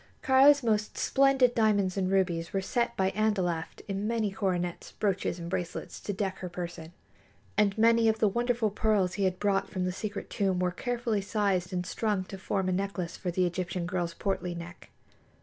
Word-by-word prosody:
Kāra's 275 +1 +6
most 210 -2 0
splendid 270 -2 +4
diamonds 205 -5 +2
and 190 -2 0
rubies 180 -3 0
were 195 - +1
set 235 +5 -1
by 190 0 +2
Andalaft 185 -6 -1
in 200 +1 -2
many 225 -3 0
coronets, 180 -3 -2
brooches 195 -4 -1
and 170 -1 -6
bracelets 180 -1 -4
to - - -4
deck 190 -1 -3
her 180 - -5
person, 170 -2 -6 0.6
and 205 -1 +2
many 230 0 +5
of 220 - +1
the 220 - +3
wonderful 235 0 0
pearls 205 -4 +1
he 200 - 0
had 185 -1 0
brought 195 -1 +1
from 185 -2 -2
the 185 - 0
secret 205 +2 -5
tomb 190 -2 +1
were 180 0 +1
carefully 235 +1 -1
sized 195 -3 0
and 180 -1 -2
strung 205 0 -1
to 190 +1 -9
form 190 0 -1
a - - +1
necklace 185 -2 -2
for 180 - -4
the 180 +1 +1
Egyptian 175 0 -2
girl's 175 -2 -2
portly 180 -3 -2
neck. 170 +1 -9
195 Hz, 185 wpm, -29 LUFS, 180-215 Hz, 0.6 s, Kāra's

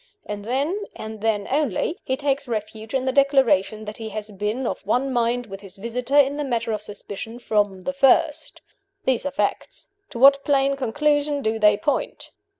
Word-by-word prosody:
And 205 -1 -6
then, 290 - -1
and 220 -1 -8
then 215 -2 0
only, 295 - 0
he 260 - -1
takes 280 -1 -1
refuge 220 0 -5
in 260 -1 0
the 260 - +1
declaration 260 -7 +3
that 210 0 -7
he 225 -1 -6
has 215 0 -6
been 210 +6 -2
of - - -3
one 250 +6 0
mind 240 0 +1
with 195 -2 -9
his 195 -2 -12
visitor, 245 +6 -2
in 285 0 +4
the 295 - -1
matter 235 -4 -1
of 215 -1 -2
suspicion, 210 +2 -7
from 205 -5 0
the 275 - -3
first. 285 +3 +2 0.4
These 260 +1 +1
are - - -3
facts. 265 - -3 0.2
To 255 - -8
what 275 +2 +6
plain 275 -1 +2
conclusion 290 +3 0
do 220 +1 0
they 210 -1 +5
point?" 290 - -2
240 Hz, 185 wpm, -23 LUFS, 215-275 Hz, 0.4 s, what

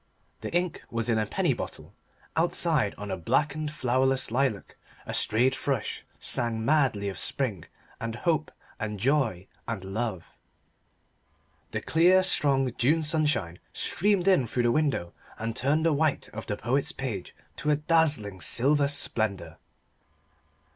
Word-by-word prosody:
The - - -6
ink 175 -1 -1
was 115 0 -2
in 110 -1 +2
a 110 - -1
penny - - +1
bottle. - - -7 0.4
Outside 160 - +1
on 105 -1 -6
a 95 - -2
blackened 150 - 0
flowerless 130 -2 +1
lilac 125 -4 -1 0.3
a - - -5
strayed 125 +5 +2
thrush 135 -4 -2 0.2
sang 115 -2 +1
madly 135 -9 +2
of 95 - -3
spring 110 - 0 0.3
and 115 0 -4
hope 155 +3 0 0.3
and 105 -2 -4
joy 120 -7 +1 0.2
and 115 -5 -4
love. 95 -1 -4 1.3
The - - -3
clear 180 +3 +4
strong 135 -8 +2
June 155 +6 +3
sunshine 150 - +1
streamed 200 -1 +1
in 180 -11 +4
through 120 +2 -1
the 120 - +3
window 140 - 0 0.2
and 115 0 -4
turned 145 +6 +1
the 165 - +4
white 155 0 0
of 110 +1 -8
the 105 - -2
poet's 130 +5 0
page 115 -9 -5 0.2
to 150 - -2
a 150 - +5
dazzling 145 - +1
silver 140 - +3
splendour. 100 - -1
130 Hz, 140 wpm, -27 LUFS, 110-150 Hz, 1.3 s, a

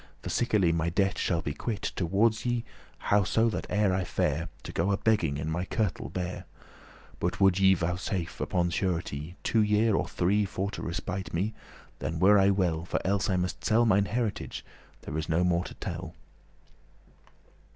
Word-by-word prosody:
For - - -4
sickerly 105 -8 +2
my 85 0 0
debte 95 +2 +1
shall 85 -2 0
be 75 - -2
quit 105 +5 -3
Towardes 105 +5 +2
you 120 -1 0 0.3
how 100 0 +2
so 115 +4 +2
that - - -4
e'er 105 -2 +2
I 95 0 0
fare 80 -1 -1
To - - -6
go 85 +4 0
a 100 - +2
begging 90 -12 +1
in 75 +1 -4
my 80 +3 -1
kirtle 100 0 -2
bare: 90 0 -4 0.7
But 90 +2 -1
would 95 -1 +4
ye 95 0 +6
vouchesafe, 90 0 -3
upon 85 -1 0
surety, 85 -3 -2
Two 115 - +2
year, 105 +1 +3
or - - +1
three, 100 +4 +1
for 95 +1 -3
to - - -6
respite 95 +2 -4
me, 100 +6 0 0.5
Then 80 - -3
were 100 +4 +6
I 95 0 +5
well, 90 -5 +1
for 85 - -2
elles 100 +2 +1
must 90 -1 -1
I - - -10
sell 115 +2 +4
Mine 100 -2 +4
heritage; 115 -1 -3 0.4
there 75 +3 -3
is 80 - -4
no 80 +2 +2
more 90 0 +1
to - - -8
tell." - - -6
95 Hz, 180 wpm, -28 LUFS, 85-105 Hz, 0.7 s, ye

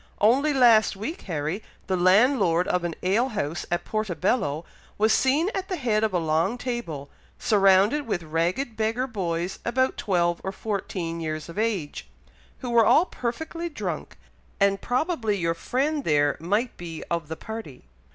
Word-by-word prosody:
Only 265 +8 +4
last 235 -7 +5
week, 300 - -5
Harry, 160 +5 -2 0.2
the 190 - 0
landlord 185 -1 +4
of 180 -1 0
an 170 -2 -2
ale 215 +8 +2
house 175 - -3
at 175 0 -1
Portobello 185 - -1 0.3
was 220 +1 +3
seen 295 +9 +2
at 380 -1 -3
the 370 - -1
head 230 -8 0
of 220 - +2
a 185 - +1
long 165 +7 +1
table, 185 - -5 0.3
surrounded 205 +7 +3
with 175 -6 -1
ragged 170 - -1
beggar 225 +4 0
boys 180 -6 -3
about 260 +2 +1
twelve 175 -3 +1
or 190 - -2
fourteen 190 -5 -4
years 155 0 -4
of 170 - -6
age, 205 -10 -2 0.5
who 250 -3 -4
were 235 -1 +6
all 310 +10 +5
perfectly 320 +6 -4
drunk, 300 - -5 0.4
and 200 0 +3
probably 245 - 0
your 165 -2 0
friend 280 - -1
there 145 -2 +2
might 205 +9 -1
be 165 -2 -7
of 170 -2 -1
the 160 +1 -6
party." 220 - -8
205 Hz, 160 wpm, -25 LUFS, 170-245 Hz, 0.5 s, were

